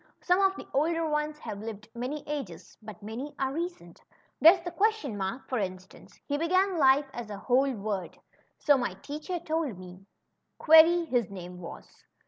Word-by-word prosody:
Some 360 Hz, +2 st, +2 dB
of 385 Hz, 0 st, +3 dB
the -, -, -9 dB
older 325 Hz, +3 st, +1 dB
ones 300 Hz, 0 st, -1 dB
have 205 Hz, -8 st, -7 dB
lived 215 Hz, -1 st, -7 dB
many 255 Hz, +5 st, -4 dB
ages, 190 Hz, -, -6 dB
but 215 Hz, -1 st, -11 dB
many 240 Hz, +8 st, -6 dB
are 265 Hz, 0 st, -1 dB
recent. 330 Hz, -, -6 dB, 0.4 s
There's 340 Hz, +4 st, +8 dB
the 350 Hz, +1 st, -6 dB
question 395 Hz, -, 0 dB
mark, 195 Hz, +6 st, -4 dB
for 255 Hz, -, -1 dB
instance. 185 Hz, -1 st, -7 dB
He 285 Hz, 0 st, -2 dB
began 370 Hz, +2 st, +2 dB
life 275 Hz, 0 st, +5 dB
as 240 Hz, -3 st, -7 dB
a 205 Hz, -, -6 dB
whole 260 Hz, +6 st, +2 dB
word, 200 Hz, -5 st, -4 dB, 0.4 s
so 285 Hz, -3 st, +3 dB
my 245 Hz, -, -2 dB
teacher 305 Hz, +5 st, -5 dB
told 315 Hz, -, -2 dB
me; 180 Hz, -1 st, -11 dB, 0.6 s
^ -, -, -52 dB
Query,' 325 Hz, +2 st, +6 dB
his 245 Hz, -, 0 dB
name 180 Hz, -2 st, -9 dB
was. 170 Hz, -, -11 dB
275 Hz, 175 wpm, -28 LUFS, 210-325 Hz, 0.6 s, There's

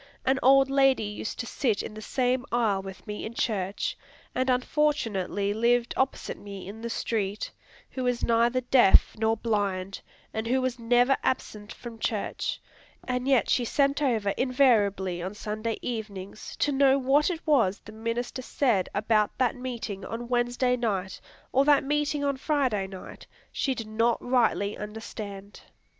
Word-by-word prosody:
An 265 Hz, +1 st, +2 dB
old 270 Hz, +1 st, +6 dB
lady 270 Hz, -3 st, +3 dB
used 210 Hz, +1 st, -5 dB
to -, -, -6 dB
sit 235 Hz, -4 st, 0 dB
in -, -, -7 dB
the 215 Hz, -, -8 dB
same 250 Hz, +2 st, 0 dB
aisle 220 Hz, -5 st, +1 dB
with 190 Hz, -1 st, -10 dB
me 210 Hz, -2 st, -5 dB
in 230 Hz, -, -6 dB
church, 205 Hz, -, -1 dB, 0.4 s
and 260 Hz, +1 st, 0 dB
unfortunately 235 Hz, -8 st, 0 dB
lived 235 Hz, +2 st, +2 dB
opposite 265 Hz, +1 st, -1 dB
me 200 Hz, -2 st, -9 dB
in 215 Hz, +3 st, -8 dB
the 235 Hz, -, -4 dB
street, 210 Hz, -3 st, -2 dB, 0.4 s
who 260 Hz, -, -4 dB
was 245 Hz, -1 st, 0 dB
neither 235 Hz, +2 st, +3 dB
deaf 245 Hz, -5 st, +5 dB
nor 220 Hz, 0 st, +1 dB
blind, 195 Hz, -4 st, -1 dB, 0.3 s
and 220 Hz, +1 st, -3 dB
who 260 Hz, +3 st, +2 dB
was 255 Hz, -1 st, -2 dB
never 245 Hz, +3 st, +4 dB
absent 210 Hz, -5 st, -2 dB
from 235 Hz, -2 st, -9 dB
church, 215 Hz, -3 st, -2 dB, 0.5 s
and 250 Hz, 0 st, -1 dB
yet 265 Hz, -4 st, +3 dB
she 250 Hz, -, +2 dB
sent 280 Hz, +4 st, +1 dB
over 225 Hz, -8 st, +1 dB
invariably 210 Hz, -9 st, +2 dB
on 190 Hz, +4 st, -5 dB
Sunday 215 Hz, +1 st, -3 dB
evenings 210 Hz, -4 st, -6 dB
to 290 Hz, -, +1 dB
know 270 Hz, 0 st, +4 dB
what 275 Hz, +4 st, +3 dB
it 335 Hz, -2 st, -5 dB
was 235 Hz, -, +3 dB
the 215 Hz, -, -10 dB
minister 230 Hz, +3 st, -3 dB
said 240 Hz, -7 st, +1 dB
about 215 Hz, 0 st, +1 dB
that 255 Hz, -1 st, +1 dB
meeting 235 Hz, -6 st, -5 dB
on 235 Hz, +3 st, -5 dB
Wednesday 245 Hz, +1 st, +1 dB
night, 195 Hz, -6 st, -2 dB, 0.3 s
or 270 Hz, -, +4 dB
that 290 Hz, -1 st, +4 dB
meeting 295 Hz, +1 st, 0 dB
on 280 Hz, -1 st, 0 dB
Friday 260 Hz, -9 st, 0 dB
night, 190 Hz, -1 st, -10 dB, 0.2 s
she 265 Hz, -2 st, -1 dB
did 225 Hz, -, -5 dB
not 225 Hz, +2 st, +1 dB
rightly 230 Hz, -5 st, +1 dB
understand! 210 Hz, -2 st, -8 dB
235 Hz, 160 wpm, -27 LUFS, 210-260 Hz, 0.5 s, old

